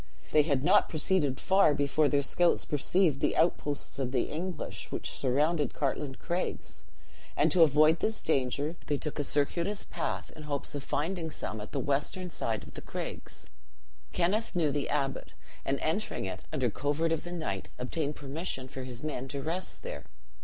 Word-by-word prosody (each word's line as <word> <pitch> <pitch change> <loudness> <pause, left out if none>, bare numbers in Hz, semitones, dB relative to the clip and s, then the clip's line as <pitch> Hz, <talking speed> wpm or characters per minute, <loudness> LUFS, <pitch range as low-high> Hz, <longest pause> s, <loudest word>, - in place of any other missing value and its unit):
They 155 - +7
had 140 -3 +1
not 190 +6 +5
proceeded 155 -4 +1
far 190 -6 +5
before 145 +1 +3
their 140 -1 +2
scouts 175 +5 +3
perceived 155 +1 +2
the - - +1
outposts 150 -4 +1
of 130 -2 -1
the 130 -2 0
English, 175 +4 -4
which - - -2
surrounded 145 +4 +1
Cartlane 140 -1 -1
Craigs; 175 +5 -3 0.5
and - - +4
to 180 - +5
avoid 155 +1 +6
this 220 -1 +1
danger, 145 +2 0
they 145 - +1
took 150 +1 -4
a - - +2
circuitous 170 +8 0
path, - - -3
in 155 - -9
hopes 145 -1 -3
of 145 - -3
finding 165 +3 -1
some 110 -7 -5
at 105 - -8
the - - -1
western 150 +6 0
side 110 -7 -2
of - - -12
the - - -7
craigs. - - -6 0.7
Kenneth 195 +6 +1
knew 160 -4 +3
the 140 -1 -1
abbot; 135 -2 -1 0.3
and 135 0 0
entering 165 - -1
it 95 -1 -5
under 130 -6 +1
covert 145 +7 0
of 165 - 0
the 175 - -7
night, 155 - -3
obtained 145 +4 -2
permission 140 -2 -3
for 130 0 -7
his 125 -1 -6
men 135 -4 -3
to 140 0 -4
rest 175 +4 -3
there. - - -6
150 Hz, 175 wpm, -30 LUFS, 135-170 Hz, 0.7 s, They